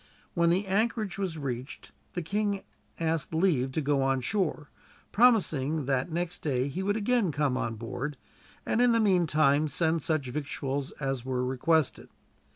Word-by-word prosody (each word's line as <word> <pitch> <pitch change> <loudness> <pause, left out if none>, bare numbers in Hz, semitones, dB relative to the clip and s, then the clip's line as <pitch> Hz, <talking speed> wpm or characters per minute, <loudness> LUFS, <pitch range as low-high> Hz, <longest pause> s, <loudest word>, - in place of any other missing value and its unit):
When 170 -1 +3
the 185 +4 +2
anchorage 205 0 0
was 185 -5 -2
reached 130 -2 -6 0.2
the 175 - -3
king 200 +2 -1 0.4
asked 160 -1 -1
leave 155 -7 +2
to 160 - 0
go 140 -1 +1
on 135 -1 +1
shore, 155 - -2 0.4
promising 160 - +3
that 135 +4 0
next 175 +1 -2
day 130 -2 -1
he 175 +7 -4
would 205 +2 0
again 220 -4 +1
come 145 -3 0
on 115 -3 -2
board, 125 +6 -5 0.5
and 230 - +1
in 245 -1 +5
the 230 - +3
meantime 155 -7 +3
send 160 +1 +1
such 155 -2 0
victuals 140 0 -3
as 135 -3 -3
were 125 -1 -1
requested. 140 +4 +1
155 Hz, 160 wpm, -28 LUFS, 135-190 Hz, 0.5 s, in